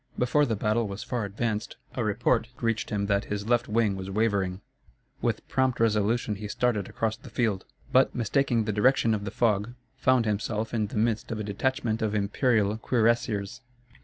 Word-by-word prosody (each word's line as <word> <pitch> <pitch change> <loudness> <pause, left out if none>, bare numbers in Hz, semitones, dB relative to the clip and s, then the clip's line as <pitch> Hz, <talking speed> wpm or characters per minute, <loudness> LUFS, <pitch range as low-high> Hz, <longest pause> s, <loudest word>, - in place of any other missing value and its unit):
Before 145 +4 +3
the 115 - 0
battle 110 +2 0
was 100 +1 -6
far 120 -4 -2
advanced, 105 +1 -3 0.2
a - - -2
report 115 - +1
reached 115 -1 -1
him 100 -1 -1
that 100 0 +1
his 105 0 -4
left 120 0 +2
wing 105 -2 +1
was 95 0 -6
wavering. 100 -3 0 0.6
With - - -1
prompt 130 -2 +1
resolution 110 0 +1
he 105 +1 -6
started 105 -2 0
across 110 -1 -1
the - - -13
field, 105 -6 -1 0.3
but, 130 +1 +4
mistaking 120 0 +1
the 105 0 -2
direction 115 +1 +3
in 100 -1 -2
the - - -2
fog, 110 +1 0 0.2
found 130 -2 +3
himself 110 +1 -2
in 110 -3 0
the 105 - -6
midst 110 +1 0
of 110 - -3
a - - -2
detachment 115 +2 -1
of 110 -1 0
imperial 105 0 +2
cuirassiers. 115 -1 0
110 Hz, 180 wpm, -27 LUFS, 105-120 Hz, 0.6 s, but